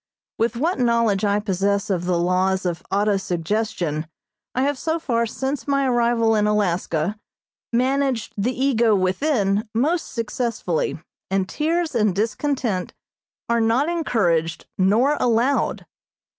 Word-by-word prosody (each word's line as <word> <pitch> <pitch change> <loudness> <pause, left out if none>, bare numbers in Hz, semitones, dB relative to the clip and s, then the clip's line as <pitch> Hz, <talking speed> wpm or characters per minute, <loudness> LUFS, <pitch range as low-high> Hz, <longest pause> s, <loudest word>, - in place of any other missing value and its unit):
With 230 +2 +1
what 320 +5 0
knowledge 230 -4 +2
I 205 0 +2
possess 200 0 0
of 180 -2 -1
the 180 -1 +1
laws 185 +2 +1
of 175 -1 -2
auto 205 +1 +2
suggestion, 175 -3 -2 0.5
I 260 - +2
have 285 -1 0
so 320 0 0
far 235 -7 0
since 265 +5 -3
my 275 -1 +2
arrival 235 -2 +2
in 210 -1 +2
Alaska 185 -2 0 0.5
managed 255 -1 0
the 215 +5 0
ego 235 -5 +3
within 200 +1 +1
most 315 +9 0
successfully, 230 -7 -2 0.3
and 190 0 0
tears 325 - -1
and 215 -6 +2
discontent 220 -2 -1 0.5
are 235 0 +2
not 235 +7 +2
encouraged 175 - 0
nor 230 +10 +3
allowed. 245 +3 +1
225 Hz, 130 wpm, -22 LUFS, 190-255 Hz, 0.5 s, ego